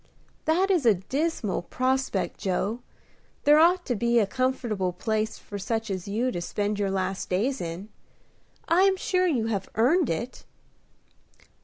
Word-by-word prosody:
"That 365 +5 +2
is 350 -6 +2
a 215 - +6
dismal 255 - -2
prospect, 255 -5 -1
Joe. 195 +4 -1 0.6
There 295 +1 +6
ought 350 +2 +4
to 245 - 0
be 235 +2 +1
a 220 - +5
comfortable 235 -5 -1
place 220 +4 -2
for 205 - -8
such 220 +2 -2
as 185 -1 -4
you 230 +6 0
to 175 - -4
spend 205 +3 -2
your 200 -1 0
last 190 0 -2
days 235 +9 0
in. 170 +4 -5 0.8
I 340 +2 +4
am 385 0 +4
sure 370 0 +1
you 250 -10 +1
have 200 -4 -2
earned 275 +7 +3
it." 230 +10 -4
225 Hz, 155 wpm, -26 LUFS, 195-275 Hz, 0.8 s, a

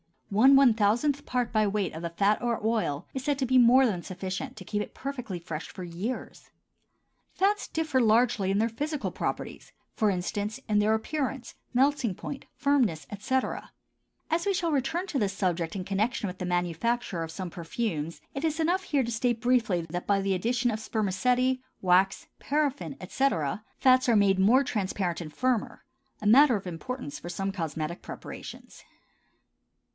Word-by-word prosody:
One 255 +7 +6
one 270 -4 +7
thousandth 240 +7 +1
part 245 -2 -1
by 215 -2 +2
weight 200 -2 -1
of 160 - -6
the 170 - -3
fat 200 +5 +1
or 240 -2 0
oil 210 -9 0
is 265 - -4
said 285 0 0
to 265 - +1
be 260 +1 +3
more 250 +2 +7
than 195 -8 0
sufficient 185 +1 -5
to 185 - -9
keep 210 +3 -2
it - - -7
perfectly 250 -8 -5
fresh 165 -2 -6
for 185 - -8
years. 180 +9 -5 0.8
Fats 410 +2 +1
differ 315 -5 0
largely 220 -4 +3
in 195 - +2
their 225 +2 +2
physical 290 +6 -3
properties—for 215 -3 -3
instance, 205 +5 -2
in 210 -1 +3
their 210 +1 +3
appearance, 265 +1 -3 0.2
melting 260 -5 +2
point, 275 +8 -7
firmness, 255 - +1
etc. 255 +6 -2 0.6
As 335 +3 +1
we 400 - +2
shall 340 -3 0
return 295 +6 0
to 285 - -1
this 200 -3 0
subject 175 -3 -1
in 190 - -3
connection 205 +5 -1
with 180 0 -7
the 180 - -3
manufacture 175 +3 -1
of 165 - -4
some 180 +1 -6
perfumes, 165 -2 -3
it 275 +4 -2
is 315 0 -1
enough 350 +4 +1
here 285 -6 +1
to 235 - -3
state 235 0 0
briefly 235 -8 +2
that 175 +2 -4
by 200 -1 +3
the 195 0 0
addition 240 +6 +1
of 215 - -3
spermaceti, 250 +5 +1 0.2
wax, 185 +1 +3
paraffin, 285 -1 -1
etc., 205 - 0
fats 255 0 +4
are 235 - +5
made 195 -2 +4
more 235 +8 +5
transparent 190 -7 -2
and 155 -3 -8
firmer—a 255 -3 -3
matter 255 +4 +7
of 200 - -4
importance 180 - -5
for 175 - -8
some 195 +2 -2
cosmetic 165 -2 -4
preparations. - - -9
220 Hz, 170 wpm, -28 LUFS, 185-260 Hz, 0.8 s, one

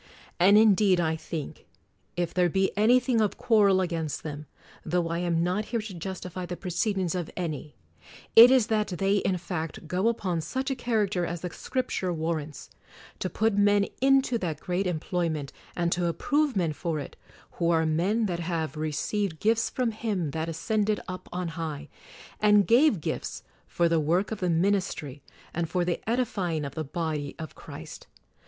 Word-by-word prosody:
And 195 +4 +7
indeed 205 -3 +5
I 160 -2 +1
think, 160 -2 -7 0.5
if 175 -1 -1
there 180 -1 +3
be 190 +3 0
any 225 +5 +5
thing 245 -2 +1
of 210 - 0
quarrel 200 -4 +4
against 165 -5 -3
them, 150 -1 -6 0.2
— - - -24
tho 170 0 0
I 170 +1 -1
am 170 -1 +1
not 185 +5 0
here 230 +1 -2
to 215 -2 -6
justify 180 0 -6
the 175 0 -5
proceedings 185 0 -1
of 175 -3 -3
any, 155 -4 -4 0.3
— - - -20
it 230 +2 +11
is 260 -4 +5
that 215 -2 0
they, 195 +2 +1
in 190 -1 0
fact, 165 -2 -5
go 185 +6 0
upon 185 -7 0
such 260 - -3
a - - 0
character 215 -7 0
as 170 -1 -3
the 180 - -4
Scripture 250 -8 -2
warrants: 160 -3 -4 0.5
To 185 - -2
put 220 +3 +1
men 205 0 +4 0.2
into 270 -3 +3
that 165 -6 -3
great 180 +2 -1
employment, 165 -3 -2 0.2
and 170 -1 +1
to 175 0 +1
approve 290 - +1
men 170 -5 +1
for 160 0 -3
it, 140 - -8 0.4
who 170 -1 -1
are 165 -1 +3
men 185 +9 +1
that 175 -4 -2
have 165 -3 -2
"received 155 +4 -2
gifts 225 +1 +2
from 250 -3 -1
Him 205 -8 -2
that 160 +2 -3
ascended 210 +5 0
up 185 -1 -7
on 180 -1 -3
high, 155 -3 -5 0.5
and 210 -1 +5
gave 240 - +4
gifts" - - -4 0.2
for 170 - +1
the 165 -1 +2
work 170 +7 +1
of 220 - -3
the 180 - 0
ministry 165 -6 0 0.3
and 170 -1 -2
for 180 -1 0
the 175 -1 -1
edifying 190 - -1
of 140 - -6
the 160 - -3
body 150 -2 -3
of 160 -2 -7
Christ. - - -10
180 Hz, 180 wpm, -27 LUFS, 165-210 Hz, 0.5 s, it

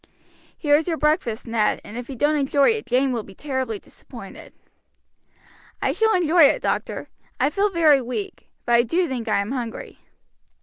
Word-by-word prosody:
"Here 290 -2 +3
is 315 +3 +1
your 330 -2 -1
breakfast, 285 -7 0
Ned, 225 -3 0
and 210 - -10
if 245 +1 -7
you 270 - -6
don't 295 +5 +2
enjoy 280 +3 +3
it 445 -1 -4
Jane 255 +2 +2
will 235 -2 -1
be 195 -2 -14
terribly 260 -5 -3
disappointed." - - -12 1.3
"I - - 0
shall 445 0 +2
enjoy 340 -2 +5
it, - - +2
doctor. - - -2 0.3
I 270 +3 +2
feel 400 +5 +1
very 315 -7 +4
weak; 375 - -6 0.2
but 240 - +1
I 235 - +6
do 335 +10 0
think 250 -4 -4
I 215 - +2
am 200 +4 -5
hungry." 245 -4 -6
275 Hz, 180 wpm, -23 LUFS, 240-320 Hz, 1.3 s, I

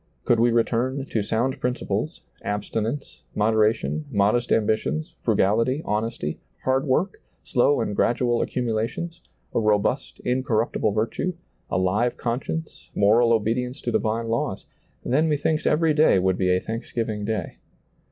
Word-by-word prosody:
Could 120 - +3
we 120 +1 +5
return 120 +3 +1
to 110 - +1
sound 115 +5 -1
principles, 125 - -2 0.2
abstinence, 110 +6 -3
moderation, 110 +7 +1
modest 110 +1 +2
ambitions, 105 -8 0
fru - - +1
gality, 115 +9 +2
honesty, 105 -8 -2 0.2
hard 130 +2 +1
work, 175 +9 0 0.2
slow 125 +2 +2
and 105 -2 -2
gradual 120 +1 +2
accumulations, 125 +8 -2 0.3
a - - +2
robust, 110 +5 +1
incorruptible 125 -4 0
virtue, 115 - -1 0.3
a - - 0
live 100 +6 +1
conscience, 135 +7 -4
moral 115 +4 +4
obedience 120 +4 0
to 120 - -2
divine 115 +1 0
laws; 115 +1 -2 0.4
then 155 +5 +2
methinks 155 +1 +1
every 155 +1 +3
day 150 -8 +5
would 95 0 +2
be 90 0 0
a 90 0 +3
thanks 115 +4 -6
giving 110 -3 -2
day. 105 -4 -3
115 Hz, 135 wpm, -24 LUFS, 105-130 Hz, 0.4 s, we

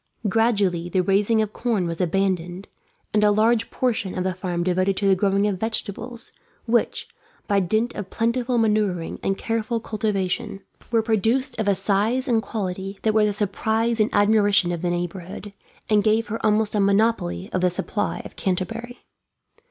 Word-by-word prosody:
Gradually 200 -6 +1
the 185 0 +2
raising 205 +4 +2
of 210 -1 -6
corn 225 -7 0
was 170 +1 -3
abandoned, 180 0 -1 0.5
and 210 0 +3
a 210 - +6
large 220 +2 +2
portion 220 -7 -1
of 180 - 0
the 185 0 -1
farm 175 -1 -3
devoted 185 +2 +1
to 200 - +1
the 195 - +6
growing 195 +1 +1
of 200 -3 -1
vegetables; 225 +2 -3 0.3
which, 235 0 0 0.4
by 200 -1 +3
dint 215 +6 0
of 195 -2 -6
plentiful 240 +3 0
manuring 210 -6 0
and 195 0 -1
careful 230 +1 -1
cultivation, 210 -1 -2 0.3
were 230 -1 +2
produced 225 +4 +1
of 220 - -1
a 200 - +4
size 215 +7 0
and 230 -3 +2
quality 195 -2 -4
that 220 - +2
were 215 -1 +4
the 210 - +1
surprise 220 +3 0
and 215 - +3
admiration 205 -3 +3
of 170 -2 -3
the 175 - 0
neighbourhood, 175 +3 -5 0.3
and 210 -1 +3
gave 220 +2 +2
her 225 - -4
almost 215 0 +2
a 210 - +1
monopoly 200 - +1
of 185 - 0
the 180 - +3
supply 205 +4 -3
of - - -10
Canterbury. 225 +6 -3
205 Hz, 170 wpm, -23 LUFS, 185-225 Hz, 0.5 s, a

